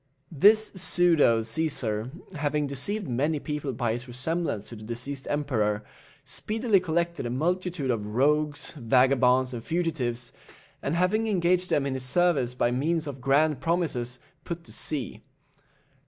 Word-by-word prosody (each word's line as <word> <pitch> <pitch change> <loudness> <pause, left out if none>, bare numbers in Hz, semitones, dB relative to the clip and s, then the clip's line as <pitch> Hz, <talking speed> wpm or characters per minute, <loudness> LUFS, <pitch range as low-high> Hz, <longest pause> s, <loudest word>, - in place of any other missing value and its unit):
This 210 +8 +5
pseudo 170 - +4
Cæsar, 115 -3 -1 0.3
having 150 0 0
deceived 165 +9 -1
many 145 +5 0
people 150 -1 -4
by 120 -2 -1
his 120 +3 -4
resemblance 125 -2 -3
to 120 - -8
the 110 - -11
deceased 125 +5 -5
emperor, 110 -8 0 0.4
speedily 220 -2 +1
collected 170 -4 -1
a - - -3
multitude 170 +1 -1
of 105 -2 -3
rogues, 150 +3 +1
vagabonds, 130 -1 +3
and 115 -2 -6
fugitives, 130 -9 -2 0.5
and 140 - -1
having 200 +6 +1
engaged 180 -2 +1
them 140 - +1
in 140 - -1
his 130 - -3
service 135 -3 +2
by 120 -1 +1
means 155 +6 0
of 135 -3 -7
grand 140 +2 +2
promises, 145 -8 -1 0.3
put 170 0 -6
to - - -13
sea. 130 -7 -2
145 Hz, 140 wpm, -27 LUFS, 125-170 Hz, 0.5 s, This